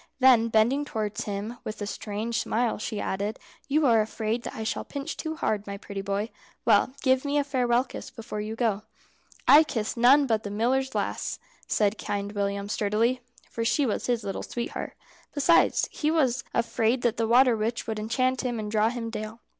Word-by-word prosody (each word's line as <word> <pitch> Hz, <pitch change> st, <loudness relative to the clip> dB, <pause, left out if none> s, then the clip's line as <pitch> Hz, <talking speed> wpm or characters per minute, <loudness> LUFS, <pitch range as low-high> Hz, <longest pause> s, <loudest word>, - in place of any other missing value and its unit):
Then 250 Hz, -3 st, +6 dB
bending 230 Hz, +6 st, +3 dB
towards 215 Hz, -7 st, -3 dB
him, 210 Hz, +3 st, -4 dB
with 215 Hz, -, -6 dB
a 205 Hz, -, -3 dB
strange 215 Hz, +2 st, -3 dB
smile, 235 Hz, -1 st, 0 dB
she 215 Hz, 0 st, -4 dB
added, 200 Hz, +3 st, -2 dB, 0.3 s
"You 300 Hz, +2 st, +2 dB
are 230 Hz, -4 st, +5 dB
afraid 220 Hz, +2 st, -2 dB
that -, -, -7 dB
I 220 Hz, -, -4 dB
shall 220 Hz, -, -2 dB
pinch 280 Hz, -1 st, -5 dB
too 315 Hz, -1 st, -4 dB
hard, 215 Hz, -10 st, -1 dB
my 200 Hz, 0 st, -5 dB
pretty 200 Hz, -1 st, -6 dB
boy. 200 Hz, +3 st, -2 dB, 0.3 s
Well, 230 Hz, +4 st, +4 dB
give 260 Hz, -1 st, +3 dB
me 285 Hz, 0 st, 0 dB
a 290 Hz, -, +3 dB
farewell 250 Hz, -3 st, +2 dB
kiss 255 Hz, -, -9 dB
before 220 Hz, -2 st, -6 dB
you 215 Hz, +1 st, -4 dB
go." 225 Hz, -4 st, 0 dB, 0.7 s
"I 300 Hz, +2 st, +9 dB
kiss 225 Hz, -8 st, -3 dB
none 260 Hz, +5 st, +6 dB
but 225 Hz, -4 st, +1 dB
the 205 Hz, -, -6 dB
miller's 255 Hz, +6 st, 0 dB
lass," -, -, -2 dB, 0.3 s
said 210 Hz, 0 st, +1 dB
Kind 200 Hz, 0 st, -3 dB
William, 200 Hz, -1 st, -2 dB
sturdily; 220 Hz, +4 st, +1 dB, 0.3 s
for 230 Hz, -, -2 dB
she 275 Hz, +5 st, +2 dB
was 220 Hz, -, -2 dB
his 240 Hz, -3 st, 0 dB
little 195 Hz, -1 st, -4 dB
sweetheart. 240 Hz, 0 st, -5 dB, 0.4 s
Besides, 290 Hz, +4 st, +4 dB
he 300 Hz, -, -1 dB
was 265 Hz, -6 st, +2 dB
afraid 235 Hz, +1 st, +1 dB
that 240 Hz, -1 st, +1 dB
the 225 Hz, 0 st, +1 dB
water 245 Hz, +1 st, +5 dB
witch 225 Hz, +2 st, -2 dB
would 220 Hz, -2 st, -3 dB
enchant 255 Hz, +4 st, 0 dB
him 245 Hz, -3 st, -2 dB
and 210 Hz, -1 st, -4 dB
draw 215 Hz, 0 st, +3 dB
him 230 Hz, -1 st, -4 dB
down. 215 Hz, 0 st, -5 dB
230 Hz, 195 wpm, -27 LUFS, 215-255 Hz, 0.7 s, I